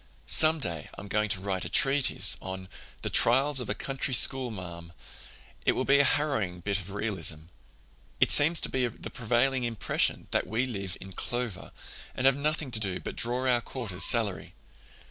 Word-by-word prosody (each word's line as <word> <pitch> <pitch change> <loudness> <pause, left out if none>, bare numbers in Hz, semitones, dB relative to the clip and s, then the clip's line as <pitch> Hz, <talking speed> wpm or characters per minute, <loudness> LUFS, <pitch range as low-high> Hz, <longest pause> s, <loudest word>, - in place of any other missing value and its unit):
Some 160 +1 +7
day 85 - -4
I'm 100 - -9
going 105 +1 -1
to 95 - 0
write 95 -1 -4
a - - -6
treatise 135 -8 +2
on 95 0 -8 0.3
'The - - -3
Trials 140 0 +3
of 125 - -6
a 100 - -2
Country 135 +2 -3
Schoolmarm.' 90 -11 +1 0.7
It - - +2
will 130 - -2
be 140 +1 +4
a - - +6
harrowing 120 -13 -1
bit 100 +2 -1
of 95 0 -9
realism. 95 -6 -2 0.7
It - - +3
seems 160 +3 +5
to - - 0
be 130 -2 -1
the 115 - -10
prevailing 125 +2 0
impression 115 -4 -1
that - - 0
we 110 +6 -1
live 100 -7 -5
in 95 - -11
clover, 120 0 -5 0.4
and 125 - -3
have 135 0 +5
nothing 150 -1 -2
to 110 - 0
do 95 -4 -3
but - - -8
draw 125 +2 -1
our 120 -2 +2
quarter's 110 -8 -3
salary. 110 -5 +2
115 Hz, 180 wpm, -27 LUFS, 95-130 Hz, 0.7 s, Some